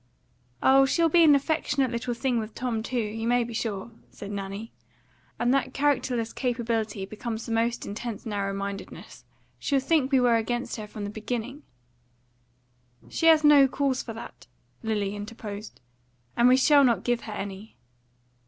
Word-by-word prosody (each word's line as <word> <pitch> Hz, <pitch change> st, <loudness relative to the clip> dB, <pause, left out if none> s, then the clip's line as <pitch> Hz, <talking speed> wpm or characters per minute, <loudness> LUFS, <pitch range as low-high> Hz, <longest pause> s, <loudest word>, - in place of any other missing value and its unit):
"Oh, 270 Hz, 0 st, +6 dB
she'll 335 Hz, +4 st, +2 dB
be 340 Hz, +2 st, +5 dB
an 300 Hz, -3 st, +7 dB
affectionate 280 Hz, -2 st, 0 dB
little 240 Hz, 0 st, -3 dB
thing 245 Hz, -1 st, 0 dB
with 215 Hz, 0 st, -6 dB
Tom 240 Hz, -3 st, -2 dB
too, 250 Hz, +3 st, -4 dB
you 225 Hz, 0 st, -2 dB
may 245 Hz, 0 st, +3 dB
be 235 Hz, 0 st, -7 dB
sure," 220 Hz, -1 st, -3 dB, 0.2 s
said 200 Hz, -, -9 dB
Nanny. 200 Hz, +2 st, -5 dB, 0.7 s
"And 245 Hz, +2 st, +2 dB
that 270 Hz, -1 st, 0 dB
characterless 255 Hz, -5 st, 0 dB
capability 230 Hz, -5 st, -2 dB
becomes 220 Hz, +2 st, -5 dB
the -, -, -6 dB
most 230 Hz, +1 st, 0 dB
in -, -, -5 dB
tense 220 Hz, 0 st, -6 dB
narrow 200 Hz, -2 st, -2 dB
mindedness. 200 Hz, 0 st, -7 dB, 0.4 s
She'll 280 Hz, -2 st, +1 dB
think 275 Hz, 0 st, +1 dB
we 265 Hz, -, +5 dB
were 240 Hz, -2 st, +4 dB
against 240 Hz, +3 st, -2 dB
her 215 Hz, -1 st, -6 dB
from 210 Hz, 0 st, -7 dB
the 205 Hz, -, -4 dB
beginning." 240 Hz, +5 st, -5 dB, 1.5 s
"She 330 Hz, -, 0 dB
has 320 Hz, -1 st, +6 dB
no 290 Hz, -2 st, +7 dB
cause 265 Hz, -1 st, 0 dB
for 225 Hz, -, -7 dB
that," 225 Hz, -, -10 dB, 0.3 s
Lily 210 Hz, -3 st, -1 dB
interposed, 210 Hz, -2 st, -8 dB, 0.5 s
"and 235 Hz, -, +5 dB
we 255 Hz, +1 st, +6 dB
shall 285 Hz, +2 st, +5 dB
not 240 Hz, -3 st, +2 dB
give 240 Hz, -1 st, 0 dB
her 215 Hz, -, -6 dB
any." 200 Hz, +1 st, -7 dB
235 Hz, 165 wpm, -26 LUFS, 215-265 Hz, 1.5 s, an